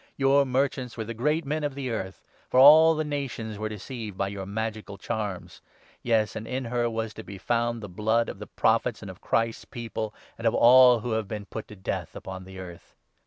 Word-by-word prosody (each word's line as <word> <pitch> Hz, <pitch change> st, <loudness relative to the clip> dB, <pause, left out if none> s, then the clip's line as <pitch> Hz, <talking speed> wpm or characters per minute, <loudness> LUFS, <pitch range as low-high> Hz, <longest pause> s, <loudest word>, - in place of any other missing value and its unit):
Your 140 Hz, 0 st, +4 dB
merchants 130 Hz, -1 st, -1 dB
were 110 Hz, -, -2 dB
the 115 Hz, +2 st, -6 dB
great 150 Hz, +8 st, 0 dB
men 150 Hz, +2 st, -2 dB
of 145 Hz, -2 st, -2 dB
the 135 Hz, -3 st, -3 dB
earth, 95 Hz, -4 st, -5 dB, 0.3 s
for 130 Hz, -, +3 dB
all 160 Hz, +4 st, +9 dB
the 155 Hz, -, -1 dB
nations 130 Hz, -8 st, -4 dB
were 110 Hz, 0 st, -2 dB
deceived 110 Hz, -1 st, -7 dB
by 100 Hz, -, -1 dB
your 100 Hz, -1 st, -6 dB
magical 110 Hz, -1 st, -4 dB
charms. 105 Hz, -3 st, -5 dB, 0.4 s
Yes, 110 Hz, -3 st, +1 dB
and 110 Hz, -, -6 dB
in 130 Hz, 0 st, -3 dB
her 120 Hz, 0 st, 0 dB
was 110 Hz, -1 st, -3 dB
to 110 Hz, -, -9 dB
be 100 Hz, -, -9 dB
found 115 Hz, +2 st, -1 dB
the -, -, -5 dB
blood 110 Hz, +5 st, +1 dB
of -, -, -7 dB
the 105 Hz, -, -8 dB
24 -, -, -41 dB
Prophets 115 Hz, +1 st, +2 dB
and 100 Hz, -, -6 dB
of 90 Hz, -, -16 dB
Christ's 115 Hz, 0 st, 0 dB
People, 115 Hz, -2 st, -5 dB, 0.3 s
and 115 Hz, -, 0 dB
of 115 Hz, -, +2 dB
all 125 Hz, -1 st, +7 dB
who 120 Hz, -, -4 dB
have 110 Hz, -2 st, -1 dB
been 105 Hz, -1 st, -5 dB
put 110 Hz, -, -7 dB
to 105 Hz, -, -11 dB
death 95 Hz, -, -4 dB
upon 95 Hz, -1 st, -8 dB
the 95 Hz, 0 st, -11 dB
earth.' 90 Hz, -2 st, -11 dB
115 Hz, 220 wpm, -26 LUFS, 105-125 Hz, 0.4 s, all